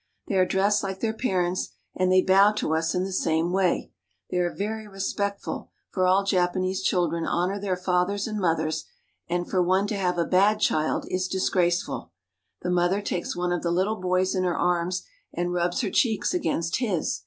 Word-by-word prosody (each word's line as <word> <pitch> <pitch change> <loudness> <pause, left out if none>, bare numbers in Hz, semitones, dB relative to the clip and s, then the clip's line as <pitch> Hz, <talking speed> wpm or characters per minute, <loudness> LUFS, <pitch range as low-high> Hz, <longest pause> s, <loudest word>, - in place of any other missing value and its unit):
They - - -3
are 185 -1 +3
dressed 200 +2 +2
like 190 -1 -4
their 220 -1 -1
parents, 185 -6 -1 0.3
and 185 0 +1
they 185 0 +5
bow 195 +2 +5
to 210 -6 -1
us 165 +3 0
in 180 - +1
the 190 - -4
same 165 -1 +1
way. 185 -1 +1 0.4
They - - -1
are 175 -1 +1
very 215 +2 -4
respectful; 200 0 -3 0.2
for 185 -1 +1
all 190 +2 +4
Japanese 185 0 0
children 175 -2 +1
honor 185 +4 0
their 190 -3 -1
fathers 180 +2 0
and 215 -1 -3
mothers, 160 -3 0 0.4
and 175 0 -1
for 185 - +1
one 185 +3 +2
to 205 - -2
have 180 -3 0
a 170 - +1
bad 200 +5 +3
child 155 -6 +1
is 185 0 -1
disgraceful 180 -2 0 0.5
The 180 - -1
mother 180 +2 +2
takes 175 - -3
one 175 0 -1
of 175 - 0
the 170 - -1
little 190 +4 0
boys 185 0 +1
in 185 -2 0
her 175 -2 0
arms 180 +1 0 0.3
and 175 +1 -1
rubs 175 0 0
her - - -2
cheeks 225 - +1
against 170 - 0
his. 205 - -1
185 Hz, 190 wpm, -26 LUFS, 175-195 Hz, 0.5 s, they